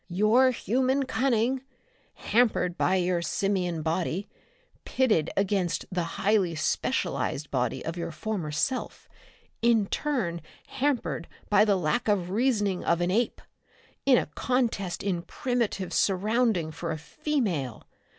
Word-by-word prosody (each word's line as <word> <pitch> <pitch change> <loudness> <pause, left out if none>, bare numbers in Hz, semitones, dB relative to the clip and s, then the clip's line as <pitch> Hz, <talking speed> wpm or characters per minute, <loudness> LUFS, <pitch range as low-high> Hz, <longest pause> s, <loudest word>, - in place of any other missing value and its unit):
"Your 215 +8 +4
human 260 +3 +1
cunning, 255 -1 +1 0.5
hampered 220 -6 +1
by 185 - +2
your 180 -1 +1
simian 180 -3 -1
body, 170 +4 -1 0.6
pitted 215 - +1
against 195 -3 0
the 180 -1 0 0.2
highly 195 -4 +2
specialized 150 -2 -1
body 125 0 -1
of 165 - -3
your 170 - -3
former 180 -3 -3
self, 250 - -2 0.5
in 230 -3 +4
turn 195 - -2 0.2
hampered 265 - -1 0.2
by 210 - +6
the 205 -2 +3
lack 170 +7 0
of 190 -4 +1
reasoning 210 -4 +1
of 170 - +2
an 175 +1 +1
ape 230 +4 0 0.6
in 265 -2 +5
a - - +1
contest 230 -8 -1
in 185 -4 -1
primitive 230 -2 -2
surrounding 205 -3 +1
for 165 +2 -5
a 155 - -2
female! 180 - -2
200 Hz, 125 wpm, -27 LUFS, 170-240 Hz, 0.6 s, by